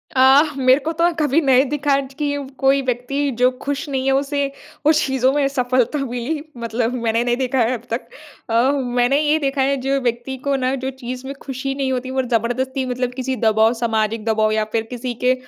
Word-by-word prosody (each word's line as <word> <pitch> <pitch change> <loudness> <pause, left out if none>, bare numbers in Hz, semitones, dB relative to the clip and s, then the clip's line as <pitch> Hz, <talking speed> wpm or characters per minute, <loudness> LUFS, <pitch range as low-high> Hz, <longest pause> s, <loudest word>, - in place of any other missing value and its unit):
अ, 265 +2 +7 0.2
मेरे 260 +1 +4
को 325 - 0
तो 335 +1 -1
अ, 345 - +4
कभी 295 0 +3
नहीं 265 -2 +4
दिखा 285 -1 +1
ज 270 0 -7
कि 285 -1 0
व 280 -2 -6
कोई 275 0 +3
व्यक्ति 260 +3 -1
जो 250 - +6 0.2
खुश 285 +1 -2
नहीं 265 -1 -2
है 270 - +3
उसे 280 0 -1 0.3
उस 310 0 +4
चीज़ों 265 -1 +2
में 285 -2 +2
सफलता 255 +1 0
मिली। 250 +5 -3 0.2
मतलब 230 +1 -1
मैंने 230 +1 +1
नहीं 240 0 0
देखा 260 0 0
है 235 +2 +2
अब 235 -1 -5
तक। 235 0 -3 0.4
अ, - - -2
हु 265 +5 +3
मैंने 250 +4 +3
ये 305 +1 +2
देखा 275 -2 -1
है 275 +1 +2
जो 275 0 +1
व्यक्ति 240 +2 -2
को 280 - +2
ना 260 0 0
जो 265 - -1
चीज़ 250 +2 -5
में 275 - -4
खुशी 270 0 -4
नहीं 270 -1 -1
होती 255 0 -2
और 260 0 -1
जबरदस्ती 260 +4 -1
मतलब 250 0 -2
किसी 260 0 -3
दबाव 220 +1 +4
सामाजिक 220 -1 0
दबाव 220 -1 +2
या 215 0 +1
फिर 225 -1 +1
किसी 245 0 -4
के 255 +1 +5
260 Hz, 220 wpm, -20 LUFS, 245-275 Hz, 0.4 s, अ